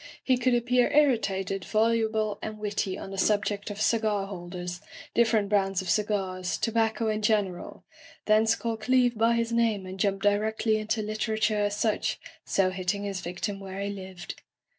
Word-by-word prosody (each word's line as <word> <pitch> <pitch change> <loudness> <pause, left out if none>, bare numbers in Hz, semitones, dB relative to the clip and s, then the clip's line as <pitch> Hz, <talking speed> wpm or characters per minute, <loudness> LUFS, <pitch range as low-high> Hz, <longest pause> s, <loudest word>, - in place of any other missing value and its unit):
He 260 - +3
could 250 0 +2
appear 245 +2 +2
irritated, 200 -10 +2
volu 220 +2 +1
ble, 215 -2 -1
and 215 0 -5
witty 205 -2 -2
on 195 - -8
the 195 - -5
subject 205 0 +1
of 205 0 -6
cigar 215 -3 +1
holders, 175 -2 -6 0.3
different 225 -3 +3
brands 195 -2 +2
of 190 -2 -1
cigars, 190 -4 -1
tobacco 225 0 0
in 215 0 0
general 205 -5 -1 0.2
— 330 - -22
thence 220 +1 +4
call 230 -1 -3
Cleeve 245 +2 +2
by 225 +2 +3
his 230 0 0
name 225 -4 +1
and 185 +1 -8
jump 195 -1 0
direcdy 215 +2 +2
into 215 +1 -1
literature 215 0 0
as 205 0 -2
such, 215 0 0 0.2
so 190 -1 +1
hitting 185 +2 -2
his 195 -2 -3
victim 185 +3 -4
where 195 0 -7
he 200 0 -2
lived. 190 -2 -8
210 Hz, 170 wpm, -27 LUFS, 195-225 Hz, 0.3 s, thence